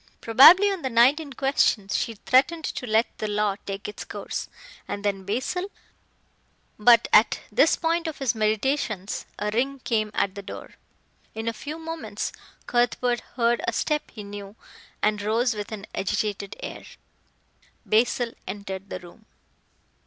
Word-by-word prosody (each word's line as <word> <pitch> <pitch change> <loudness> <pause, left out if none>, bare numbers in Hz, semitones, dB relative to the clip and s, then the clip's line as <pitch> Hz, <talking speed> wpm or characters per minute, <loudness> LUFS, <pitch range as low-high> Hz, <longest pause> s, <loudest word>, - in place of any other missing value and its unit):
Probably 330 - +8
on 385 -3 -4
the 260 - -2
night 250 +6 +5
in 290 -4 -8
question 265 -7 +1
she 225 +3 -1
threatened 280 +10 +2
to 250 - -4
let 220 +1 +1
the 215 - -2
law 205 -1 0
take 195 +1 -5
its 210 - -7
course, - - -5 0.4
and 205 0 -5
then 195 -2 -1
Basil 255 - -2 1.1
but 235 +2 +6
at 215 - +5
this 280 +9 +4
point 335 0 0
of 315 - -5
his 270 -4 0
meditations 215 -2 -1
a 210 0 -2
ring 265 +5 0
came 215 -2 0
at 195 - +1
the 200 - -7
door. 195 - -9 0.6
In 220 +1 -5
a 230 - 0
few 295 +8 -7
moments 325 0 -5 0.3
Cuthbert 245 0 +1 0.2
heard 235 -1 +2
a 235 - +1
step 300 +5 -1
he 210 - -9
knew 200 0 -9 0.5
and 210 0 +2
rose 230 +4 +1
with 210 0 -6
an 210 -2 -6
agitated 200 0 -2
air. - - -6 1.0
Basil 235 +2 +2 0.2
entered 195 0 -6
the - - -5
room. 180 +5 -16
225 Hz, 150 wpm, -25 LUFS, 205-265 Hz, 1.1 s, Probably